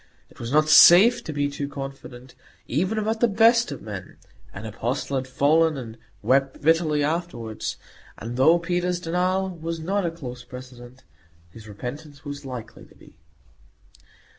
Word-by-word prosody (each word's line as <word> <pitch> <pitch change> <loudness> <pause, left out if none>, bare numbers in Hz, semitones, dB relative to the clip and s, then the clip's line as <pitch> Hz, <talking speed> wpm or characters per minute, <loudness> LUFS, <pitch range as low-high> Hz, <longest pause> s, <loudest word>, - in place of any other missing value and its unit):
It - - -19
was 115 0 -5
not 155 +1 +3
safe 205 +10 +8
to - - -4
be 145 -1 -1
too 145 0 -5
confident, 135 -2 -9 0.3
even 185 - -1
about 220 +1 -1
the 240 - +4
best 230 -1 +4
of 140 - -8
men; 100 -3 -8 0.3
an 100 +3 -9
apostle 120 +6 -3
had 130 -1 -2
fallen, 155 +4 +2
and 115 -4 -8 0.3
wept 135 +1 +1
bitterly 155 -2 +2
afterwards; 150 -9 -3 0.4
and 115 +2 -6
though 155 +7 +5
Peter's 175 +1 -1
denial 185 +3 -1
was 165 -1 -5
not 195 +5 -1
a 170 - 0
close 125 -7 -9
precedent, 125 0 -12 0.5
his 110 +2 -13
repentance 140 +8 -9
was 145 0 -7
likely 125 -4 -8
to - - -21
be. - - -19
145 Hz, 155 wpm, -24 LUFS, 125-175 Hz, 0.5 s, safe